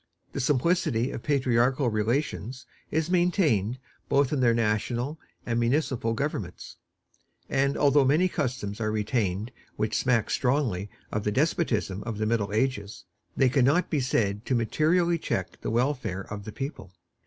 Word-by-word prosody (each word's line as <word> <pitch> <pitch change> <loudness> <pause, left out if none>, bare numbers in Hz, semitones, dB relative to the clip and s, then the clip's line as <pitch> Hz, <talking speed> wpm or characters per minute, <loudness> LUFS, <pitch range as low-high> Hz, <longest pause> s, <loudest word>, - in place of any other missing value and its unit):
The - - -3
simplicity 130 -2 +1
of - - -5
patriarchal 130 -1 +2
relations 120 +3 -2 0.2
is 160 +2 -1
maintained 160 - +2 0.3
both 140 0 +3
in 145 - 0
their 120 -2 +4
national 120 +6 -1 0.3
and 120 0 0
municipal 120 -2 +1
governments; 110 - -4 0.7
and 140 +1 +1
although 145 0 +4
many 150 +8 +3
customs 125 - -3
are 110 -1 0
retained 105 -1 -1 0.2
which 110 0 -1
smack 120 -4 +1
strongly 125 -8 0 0.2
of 105 - -2
the 105 - 0
despotism 115 - 0
of 110 -1 -5
the 110 - -1
Middle 110 -2 0
Ages, 110 -2 -1 0.3
they 135 - +5
can 125 +1 +3
not 155 +7 +2
be 150 - +2
said 105 -5 0
to 130 - +2
materially 165 +8 +2
check - - -3
the - - -3
welfare 120 -5 0
of 100 +1 -7
the 110 - -6
people. 135 - -6
125 Hz, 150 wpm, -27 LUFS, 110-140 Hz, 0.7 s, they